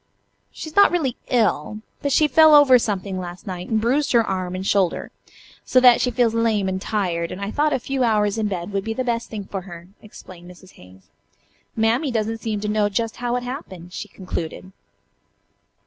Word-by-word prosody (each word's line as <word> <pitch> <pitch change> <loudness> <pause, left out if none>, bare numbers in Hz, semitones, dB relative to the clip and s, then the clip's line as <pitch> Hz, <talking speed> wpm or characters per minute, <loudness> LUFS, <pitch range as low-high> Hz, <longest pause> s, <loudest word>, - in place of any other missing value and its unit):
"She - - -8
is 315 - -11
not 405 - +7
really 300 -9 -1
ill, 215 - 0 0.2
but 285 - -1
she 305 +3 +4
fell 310 +2 +6
over 270 -4 +7
something 195 -4 -3
last 175 -1 -8
night 180 -1 -6
and 220 - +1
bruised 265 +7 0
her 235 -1 +5
arm 185 -1 -3
and 185 +1 -5
shoulder, 195 -3 0 0.5
so 255 - +3
that 250 -1 +6
she 250 - +1
feels 240 -2 +1
lame 225 -4 +1
and 190 0 -3
tired, 175 -6 -2
and 185 - -7
I 200 +1 -4
thought 300 +4 +1
a - - +1
few 265 +1 -2
hours 210 -2 +1
in 215 - 0
bed 185 -1 -4
would 195 -1 -1
be 225 +1 -4
the 255 - -1
best 235 -2 -2
thing 210 -2 -6
for 195 0 -5
her," 175 -1 -12
explained 180 -4 -13
Mrs. 180 +1 -15
Hayes. 95 +1 -18 0.7
"Mammy 230 +6 +1
doesn't 225 -1 -2
seem 215 -2 -3
to 210 - -3
know 210 -1 +1
just 225 +2 -3
how 245 0 -2
it 250 - -2
happened," 190 - -8
she 210 - -6
concluded. 185 -1 -6
215 Hz, 205 wpm, -22 LUFS, 185-245 Hz, 0.7 s, not